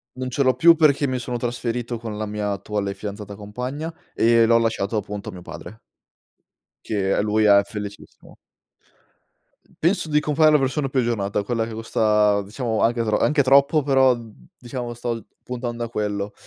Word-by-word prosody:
Non 130 0 -4
ce 140 +3 0
l'ho 130 -2 +3
più 165 +6 +6
perché 145 -3 +3
mi 130 -1 -2
sono 120 0 -4
trasferito 120 0 -3
con 110 -2 -6
la 110 - -3
mia 105 0 -3
attuale 100 0 -3
fidanzata-compagna 105 - -6 0.2
e 115 0 +4
l'ho 115 +1 +5
lasciato 115 -2 0
appunto 105 -1 -5
a - - -6
mio 90 - -10
padre 110 +5 -10 1.1
che 100 -3 0
e - - +1
lui 105 +1 +1
è 100 -1 +7
felicissimo. 105 -1 -9 1.5
Penso 170 -1 +1
di 150 - +5
compare 155 +1 +3
la 150 - +5
versione 135 +1 -1
più 130 - +1
aggiornata, 105 -5 -1
quella 115 +1 -1
che 115 - -8
costa 105 -2 +2
diciamo 110 +2 -3
anche 120 +1 +2
tro 110 -1 +1
anche 150 0 +2
troppo, 140 +3 +4
però, 135 -2 +4
mhmm, 115 +1 -14
diciamo 120 -1 -5
sto 120 0 -3
l 115 - -8 0.2
puntando 120 -1 -4
a 115 - -4
quello. 105 -2 -3
115 Hz, 175 wpm, -22 LUFS, 105-130 Hz, 1.5 s, è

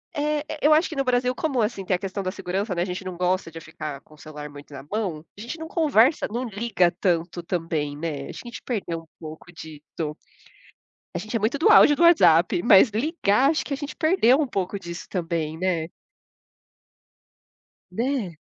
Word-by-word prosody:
É, 295 0 0 0.2
eu 305 - +7
acho 315 +3 +4
que 320 - -7
no 275 - 0
Brasil 250 0 +1
como, 270 -5 -1
assim, 210 -2 -2
tem 185 - 0
a - - -4
questão 195 +1 -4
da 185 - -2
segurança, 195 +1 -3
né, 175 - -1
a - - +1
gente 180 +1 -5
não 185 -1 -5
gosta 180 -1 0
de 165 - -8
ficar 155 -3 -7
com 155 - -20
o - - -23
celular 150 -1 -9
muito 145 0 -13
na 140 - -7
mão, 190 -8 -2
a - - -9
gente 245 +9 -6
não 320 - -6
conversa 295 -5 +3
não 240 +3 -2
liga 205 -4 +1
tanto 175 -1 0
também, 165 -4 -2
né. 150 -3 -4
A - - -5
gente 240 -1 -9
perdeu 185 -9 -3
um 165 - -21
pouco 160 +2 -10
disso. 155 -1 -7 1.0
A - - -3
gente 215 +2 -5
é - - +2
muito 220 +6 0
do 325 +8 +3
áudio 365 -8 +7
do 340 - +2
WhatsApp, 175 - +5
mas 215 +1 +7
ligar, 255 0 +2
acho 315 - 0
que 290 - -4
a - - -2
gente 290 0 -6
perdeu 315 -6 +3
um 300 - +1
pouco 195 -3 -3
disso 170 -2 -8
também, 165 -3 -3
né. 170 -2 -1 2.0
Né? 225 - -2
195 Hz, 200 wpm, -24 LUFS, 165-255 Hz, 2.0 s, eu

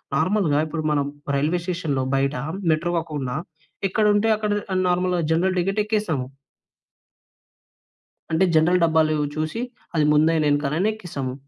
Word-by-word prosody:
నార్మల్‌గా 160 -1 +2
ఇప్పుడు 155 0 -4
మనం 145 -2 +1 0.3
రైల్వే 155 +5 0
స్టేషన్‌లో 160 -7 -1
బయట 135 +1 +1 0.4
మెట్రో 170 +3 0
కాకుండా, 145 -6 -4 0.5
ఎక్కడుంటే 210 +2 +2
అక్కడ 210 -1 -2 0.2
ఆహ్, 185 0 +1
నార్మల్‌గా 180 0 +1
జనరల్ 185 +3 +1
టికెట్ 195 +4 0
ఎక్కేసాము. 210 - -1 2.1
అంటే, 160 +4 +3
జనరల్ 170 +3 +4
డబ్బాలు 160 -1 +3 0.2
చూసి, 155 +8 -2 0.3
అది 155 -2 +3
ముందైనెనకనైనా 150 +2 +2
ఎక్కేసాము. 145 -11 -5
160 Hz, 115 wpm, -23 LUFS, 150-185 Hz, 2.1 s, జనరల్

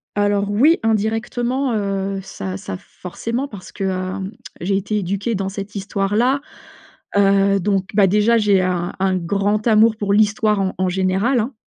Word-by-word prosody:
Alors 205 0 +1
oui! 275 +12 +4
Indirectement, 235 +4 0
heu, 195 -1 -2
ça 95 - -6
ça 95 - -6
forcément 230 - -5
parce 205 -8 -11
que, 200 - -6
hem, 190 +1 -3 0.3
j'ai 195 +3 0
été 205 +2 -2
éduquée 200 +4 -2
dans 195 0 -2
cette 200 +1 -7
histoire-là. 205 +7 0 0.8
Heu, 195 0 +4
donc, 195 0 0
bah, 200 -2 +5
déjà 210 +4 +3
j'ai 205 -3 +3
un 180 -1 -1
un 190 0 +1
grand 200 +5 0
amour 220 0 +5
pour 200 -2 0
l'histoire 215 0 +2
en 190 -1 -1
en 185 0 +1
général, 190 +7 +1
hein. 235 +5 -2
200 Hz, 160 wpm, -20 LUFS, 190-220 Hz, 0.8 s, bah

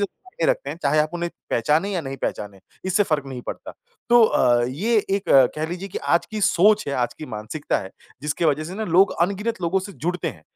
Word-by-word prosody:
ज़्यादा 205 - -5
मायने - - 0
रखते - - -2
हैं। - - -6
चाहे 145 +2 +2
आप 150 0 0
उन्हें 175 0 -2 0.2
पहचाने 155 - +1
या 185 - -1
नहीं 135 -3 -6
पहचाने 100 -2 -4 0.2
इससे 190 +2 +2
फ़र्क 155 -7 -1
नहीं 130 -2 -7
पड़ता। - - -6 0.4
तो 240 0 +7
अ, 120 - +3
ये 190 - 0
एक 195 0 +1 0.3
कह 155 - -1
लीजिए 180 +3 -5
कि - - -5
आज 170 - +1
की 215 -1 -4
सोच 210 +2 +4
है, - - -2
आज 125 -2 -1
की 155 - -9
मानसिकता 110 +7 -3
है 95 -1 -8 0.3
जिसकी 150 +3 -2
वजह 155 -1 +2
से 175 +4 -7
ना 220 +1 -3
लोग 185 +3 +4
अनगिनत 200 +4 0
लोगों 175 +3 +1
से 200 +1 -8
जुड़ते 175 0 -3
हैं। 80 - -10
170 Hz, 225 wpm, -23 LUFS, 145-200 Hz, 0.4 s, तो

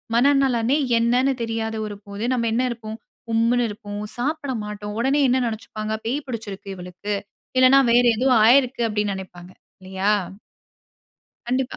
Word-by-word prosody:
மனநலனே 270 -1 +3 0.2
என்னன்னு 250 +3 +2
தெரியாத 225 -1 -3
ஒரு 205 - -6
போது 200 +2 -6
நம்ம 235 -2 0
என்ன 250 +2 +1
இருப்போம் 220 -1 -7 0.3
உம்முன்னு 235 +2 +2
இருப்போம், 205 -1 -7 0.2
சாப்பிட 285 +2 -2
மாட்டோம். 210 0 -6
உடனே 270 +4 +2
என்ன 255 +1 +3
நினைச்சுப்பாங்க 215 -1 -5
"பேய் 275 +5 -2
பிடிச்சிருக்கு 205 -5 -6
இவளுக்கு. 180 +3 -6 0.4
இல்லன்னா 260 +1 +7
வேற 245 +1 +5
ஏதோ 260 +3 +1 0.2
ஆயிருக்குது" 250 -1 +4
அப்படின்னு 210 -1 -1
நினைப்பாங்க. 180 -1 -10 0.3
இல்லையா? 190 +2 -1 1.4
கண்டிப்பா. 255 +1 -1
230 Hz, 135 wpm, -22 LUFS, 210-255 Hz, 1.4 s, இல்லன்னா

